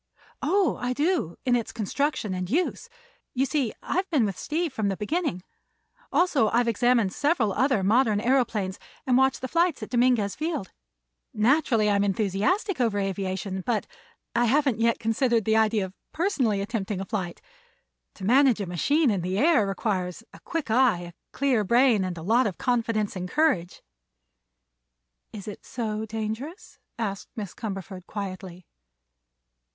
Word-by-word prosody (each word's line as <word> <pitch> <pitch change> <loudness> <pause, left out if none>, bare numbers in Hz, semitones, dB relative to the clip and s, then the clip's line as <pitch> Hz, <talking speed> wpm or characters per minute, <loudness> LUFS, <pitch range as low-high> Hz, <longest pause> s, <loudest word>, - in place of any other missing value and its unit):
"Oh, 380 +2 +2
I 245 +1 0
do, 295 - 0
in 250 -1 +3
its 235 -2 -2
construction 225 -1 -1
and 185 -1 -3
use. 340 - -1 0.5
You 260 +2 +2
see, 270 -4 0
I've 375 +2 -1
been 290 -10 +3
with 195 -2 -2
Steve 320 -1 -2
from 215 -5 -1
the 195 -1 -1
beginning; 215 - -2 0.7
also 295 -11 +3
I've 240 +1 +2
examined 230 -3 +2
several 285 - +1
other 255 -5 +2
modern 215 +1 +3
aëroplanes 225 -6 0 0.3
and 255 - +3
watched 265 +1 +3
the 260 - -3
flights 335 +1 +1
at - - -8
Dominguez 240 -5 +2
Field. 310 - -3 0.6
Naturally 230 -1 +3
I'm 200 -1 +3
enthusiastic 215 - 0
over 225 -4 +1
aviation, 190 -1 -2
but 230 0 0 0.5
I 240 +1 +3
haven't 265 -1 +2
yet 230 0 +2
considered 230 0 +1
the 220 0 +2
idea 220 -2 +2
of 185 - -10 0.2
personally 265 - +1
attempting 205 -2 -3
a 195 - -4
flight. 190 -5 -4 0.8
To 190 - -7
manage 255 +1 +4
a 200 - -2
machine 265 - +2
in 195 -3 -1
the 185 +2 -2
air 280 -6 +4
requires 195 -1 -2
a - - -13
quick 320 -9 -4
eye, 240 -6 +4
a 175 0 -9 0.2
clear 260 -6 +1
brain 235 0 +4
and 180 -2 -4
a 160 - -7
lot 230 +6 +3
of 190 - -5
confidence 230 -4 0
and 180 0 -4
courage." 275 - +1 1.5
"Is 205 -1 -9
it 210 - -8
so 220 -2 -4
dangerous?" 225 - -6 0.2
asked 200 -4 -4
Miss 205 -5 -5
Cumberford 195 -4 -6
quietly. 185 -3 -6
225 Hz, 155 wpm, -26 LUFS, 195-265 Hz, 1.5 s, manage